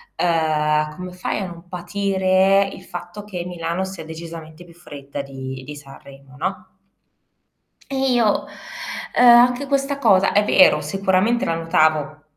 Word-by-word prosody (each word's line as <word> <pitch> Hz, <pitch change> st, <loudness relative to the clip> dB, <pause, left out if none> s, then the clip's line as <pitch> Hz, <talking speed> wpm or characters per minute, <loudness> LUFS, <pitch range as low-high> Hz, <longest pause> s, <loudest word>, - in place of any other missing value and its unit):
ehm, 155 Hz, -2 st, +1 dB
come 180 Hz, 0 st, -8 dB
fai 180 Hz, -, -3 dB
a 195 Hz, -, -3 dB
non 170 Hz, 0 st, -11 dB
patire 190 Hz, +1 st, +1 dB
il -, -, -11 dB
fatto 175 Hz, +3 st, -8 dB
che 180 Hz, -4 st, -6 dB
Milano 175 Hz, +1 st, -3 dB
sia 190 Hz, -3 st, -8 dB
decisamente 160 Hz, 0 st, -9 dB
più 170 Hz, -, -17 dB
fredda 145 Hz, -4 st, -8 dB
di 130 Hz, -1 st, -8 dB
di 150 Hz, +2 st, -9 dB
Sanremo, 135 Hz, -1 st, -14 dB
no?" 185 Hz, +2 st, -4 dB, 1.2 s
E 270 Hz, -, -3 dB, 0.2 s
io, 225 Hz, -4 st, +1 dB, 0.7 s
ehm, 245 Hz, -, +5 dB
anche 250 Hz, +3 st, +3 dB
questa 275 Hz, 0 st, -1 dB
cosa, 195 Hz, -7 st, +4 dB
è 205 Hz, +1 st, +4 dB
vero, 210 Hz, -, +5 dB
sicuramente 195 Hz, +8 st, +1 dB
la 165 Hz, -, 0 dB
notavo, 155 Hz, -2 st, +1 dB
175 Hz, 140 wpm, -21 LUFS, 155-195 Hz, 1.2 s, ehm